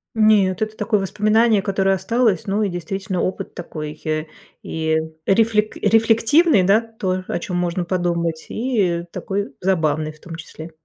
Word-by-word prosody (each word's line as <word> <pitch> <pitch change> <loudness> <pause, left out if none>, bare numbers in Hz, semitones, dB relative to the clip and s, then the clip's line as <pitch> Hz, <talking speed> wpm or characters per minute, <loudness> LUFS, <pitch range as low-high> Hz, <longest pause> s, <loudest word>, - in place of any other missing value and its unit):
Нет, 215 -4 +3
это 215 0 -2
такое 210 0 +1
воспоминание, 215 +2 +2
которое 195 -1 +1
осталось, 220 +1 0
ну, 205 +2 +1
и 205 - 0
действительно 185 +1 -3
опыт 185 - -3
такой, 155 -3 -7
э, 155 0 -1 0.4
и, 160 0 -1 0.3
рефлек 215 +1 +2
рефлективный, 225 - +4
да? 200 +4 +4
То, 190 -5 -3
о - - -2
чём 180 +1 -4
можно 175 0 -1
подумать, 170 -3 -1
и 205 -9 0
такой 200 +1 -4
забавный, 155 -4 0
в 155 - -19
том 165 0 -9
числе. 160 0 -10
190 Hz, 150 wpm, -20 LUFS, 170-215 Hz, 0.4 s, рефлективный